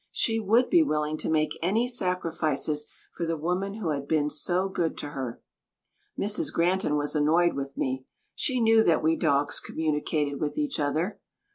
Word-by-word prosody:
She 225 -2 +2
would 225 +4 +3
be 345 - +5
willing 150 - 0
to - - -3
make 155 -1 0
any 215 +8 +1
sacrifices 165 - -1 0.3
for - - -5
the 165 -1 -1
woman 180 +5 -2
who 210 -7 -3
had 140 -2 -3
been 150 -1 +1
so 180 +5 0
good 175 -4 -2
to 145 - -4
her. 130 -5 -6 0.7
Mrs. 205 +1 +1
Granton 175 -2 +1
was 145 0 -1
annoyed 165 +4 +3
with 140 0 -5
me. 130 0 -2 0.3
She 255 -3 0
knew 225 -1 +5
that 165 -5 +2
we 160 +1 +3
dogs 145 -3 +2
communicated 150 -2 -2
with 150 -1 -2
each 295 - -1
other. 160 +8 -1
160 Hz, 170 wpm, -27 LUFS, 150-195 Hz, 0.7 s, be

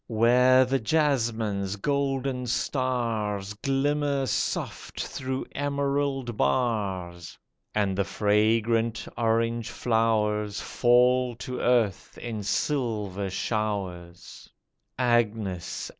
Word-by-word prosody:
Where 125 +3 +5
the 135 +1 0
jasmine's 115 -8 0
golden 135 +1 -1
stars 115 -7 -1
Glimmer 140 +3 0
soft - - -2
through 130 0 -4
emerald 140 -3 -1
bars, 95 - -1 0.4
And 100 -3 +1
the 100 - +1
fragrant 110 +3 +1
orange 115 0 0
flowers 110 -3 0
Fall 125 0 +3
to 125 +1 -6
earth 115 -6 +1
in 115 -3 -5
silver 105 -5 -1
showers, 95 -4 -4 0.5
Agnes 110 -7 0
115 Hz, 85 wpm, -26 LUFS, 105-130 Hz, 0.5 s, Where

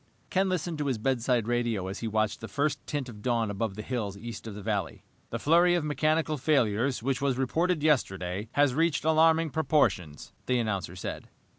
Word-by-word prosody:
Ken 190 +1 +2
listened 175 -3 -2
to 145 - -1
his 130 -4 0
bedside 120 -1 0
radio 120 -5 0
as 95 +1 -5
he 115 - -3
watched 110 -1 0
the 110 - -5
first 145 +2 -1
tint 145 -3 -2
of 105 -4 -10
dawn 115 -2 0
above 100 0 -2
the 105 - -6
hills 110 -6 -3
east 115 +1 -8
of 105 - -6
the 105 - -7
valley. 100 -5 -2 0.3
"The - - -3
flurry 175 +3 +4
of 175 - 0
mechanical 155 0 0
failures, 125 -3 +1
which 135 +1 -1
was 135 -3 +1
reported 160 +5 0
yesterday, 100 - 0
has 145 -2 +3
reached 160 +1 +1
alarming 160 0 +4
proportions," 135 - 0
the 125 - +2
announcer 100 -6 -2
said. 90 - -6
125 Hz, 190 wpm, -28 LUFS, 110-155 Hz, 0.3 s, flurry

